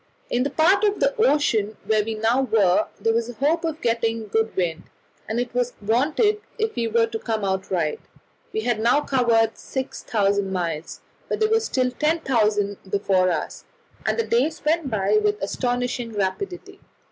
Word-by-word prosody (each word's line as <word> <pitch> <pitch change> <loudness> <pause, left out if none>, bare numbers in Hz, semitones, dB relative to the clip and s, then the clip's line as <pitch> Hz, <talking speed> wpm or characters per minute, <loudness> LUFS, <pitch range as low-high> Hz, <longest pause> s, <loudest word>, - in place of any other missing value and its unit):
In 245 - +1
the 275 - +1
part 370 +8 +3
of 410 -1 +2
the - - +2
ocean 235 - +2
where 215 -1 +2
we 220 +1 -3
now 225 +4 +2
were 210 -8 +3
there 225 - +1
was 230 +1 0
a - - -6
hope 300 +8 +1
of 320 -1 -3
getting 230 -1 0
a - - -9
good 220 +2 -1
wind, 170 -3 -1 0.4
and 225 +2 -1
it 245 -1 -3
was 245 0 0
wanted 300 - +1 0.2
if 440 0 -1
we 230 -1 0
were 230 +1 +3
to 225 -1 -5
come 220 -3 -2
out 190 0 -2
right: 165 -5 -1 0.5
we 435 - -2
had 240 - 0
now 235 +6 +3
covered 235 -5 +2
6,000 200 -7 -1
miles, 165 -4 -3 0.3
but - - -1
there 435 0 +2
were 445 - +5
still 260 - 0
10,000 230 -9 +1
before 190 -2 +2
us, 165 -3 -3 0.4
and - - 0
the 460 - 0
days 290 +7 0
went 315 -2 +1
by 210 -1 +2
with 210 0 +1
astonishing 245 +2 -2
rapidity. 210 - -3
230 Hz, 180 wpm, -23 LUFS, 205-285 Hz, 0.5 s, were